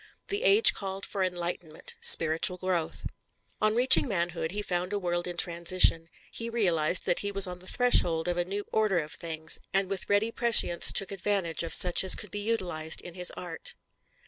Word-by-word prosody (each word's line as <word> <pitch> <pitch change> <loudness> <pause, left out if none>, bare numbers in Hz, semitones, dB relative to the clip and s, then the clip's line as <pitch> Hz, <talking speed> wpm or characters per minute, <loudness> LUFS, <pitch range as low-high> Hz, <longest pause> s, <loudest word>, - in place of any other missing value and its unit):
The 405 +2 -4
age 450 -2 +5
called 195 0 -7
for 200 - -6
enlightenment, 175 -3 -6
spiritual 165 +3 +5
growth. 180 -3 -4 0.6
On 215 0 0
reaching 250 +3 +4
manhood, 170 -5 -4
he 205 +4 -6
found 180 -1 -5
a - - -2
world 175 -2 -4
in 175 -1 -8
transition; 170 -1 +2 0.2
he 230 0 -7
realized 180 -7 +1
that 175 - -1
he 200 - -4
was 195 -1 +2
on 180 -1 -9
the 185 - -15
threshold 175 -10 +1
of 175 - -2
a 175 - -1
new 200 +3 -7
order 215 -4 -1
of 155 -2 -5
things, 160 -1 -2
and 195 0 -1
with 195 - -4
ready 205 +3 -1
prescience 230 -8 +5
took 195 - +1
advantage 195 -3 -2
of 165 - -6
such 180 0 +6
as 190 - +5
could 210 - -9
be 205 - -6
utilized 180 -8 -3
in 175 - -13
his 180 0 0
art. 170 -3 -5
180 Hz, 190 wpm, -26 LUFS, 170-205 Hz, 0.6 s, such